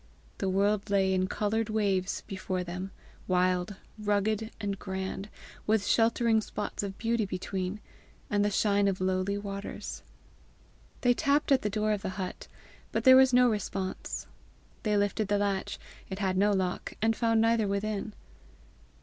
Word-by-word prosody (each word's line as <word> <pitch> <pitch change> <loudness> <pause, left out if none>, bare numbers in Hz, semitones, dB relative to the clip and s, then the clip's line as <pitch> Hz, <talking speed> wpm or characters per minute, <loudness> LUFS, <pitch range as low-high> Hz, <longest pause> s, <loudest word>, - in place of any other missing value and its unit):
The 190 - 0
world 200 +2 +1
lay 195 -1 +3
in 185 0 +1
coloured 215 +3 -1
waves 200 -3 0
before 185 -1 -3
them, 180 +2 -5 0.4
wild, 185 +1 +1 0.2
rugged, 210 +1 0
and 200 -2 -3
grand, 190 +1 -4 0.4
with 215 -1 +2
sheltering 225 -1 +3
spots 210 0 -4
of 195 -1 -5
beauty 230 0 0
between, 185 +1 -3 0.5
and 205 0 +1
the 205 - +2
shine 205 0 +2
of 195 -1 0
lowly 185 +2 0
waters. 200 0 -6 1.0
They 245 -1 +4
tapped 280 +4 +1
at 270 - +5
the 210 - -1
door 215 +1 0
of 210 -2 0
the 200 - -3
hut, 185 -2 -5 0.4
but - - -1
there 260 -1 +9
was 265 0 +7
no 250 0 +6
response; 195 -4 -3 0.6
they 210 -1 +1
lifted 205 +1 +1
the 205 0 +2
latch 200 -1 -1 0.3
it 190 - -4
had 190 -2 0
no 200 +2 +4
lock 185 -2 -1
and 225 +1 +2
found 225 -1 +2
neither 225 -1 +3
within. 205 +1 -2
205 Hz, 155 wpm, -29 LUFS, 190-220 Hz, 1.0 s, there